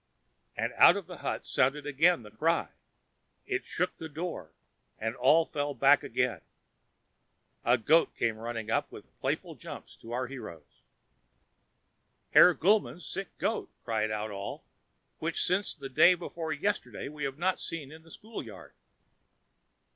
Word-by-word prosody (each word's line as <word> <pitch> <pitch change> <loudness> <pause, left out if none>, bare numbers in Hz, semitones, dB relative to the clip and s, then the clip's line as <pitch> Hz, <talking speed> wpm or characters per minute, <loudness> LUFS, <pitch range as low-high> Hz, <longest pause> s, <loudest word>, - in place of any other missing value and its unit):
And - - -1
out - - +8
of - - -5
the - - -9
hut - - -3
sounded 140 +3 +1
again 150 +1 +3
the 105 - -12
cry; 160 +10 +1 0.8
it 390 -2 -2
shook 180 +2 -2
the 160 - -7
door, 155 - -5 0.5
and 115 +2 -3
all 150 +6 +5
fell 145 -2 -3
back 140 +1 +5
again. - - -1 1.2
A 120 +2 +4
goat 155 +9 +3
came 115 -2 0
running 115 -1 -4
up, - - 0
with - - -13
playful - - -2
jumps, - - -10
to 115 - -11
our 125 +2 -1
heroes. 100 - -10 1.5
"Herr 180 - +8
Gulmann's 195 -1 +2
sick 195 0 -6
goat!" 225 - -1 0.2
cried 110 -2 0
out 110 0 -3
all, 100 0 -6 0.6
"which, - - -2
since 185 +3 0
the 140 -3 -7
day 175 +7 +6
before 165 -2 -5
yesterday, 200 +8 -2
we 150 +1 -7
have 135 0 -3
not 185 +3 0
seen 150 -4 -6
in 160 +1 -12
the 165 - -19
schoolyard." 115 - -9
145 Hz, 145 wpm, -30 LUFS, 115-170 Hz, 1.5 s, out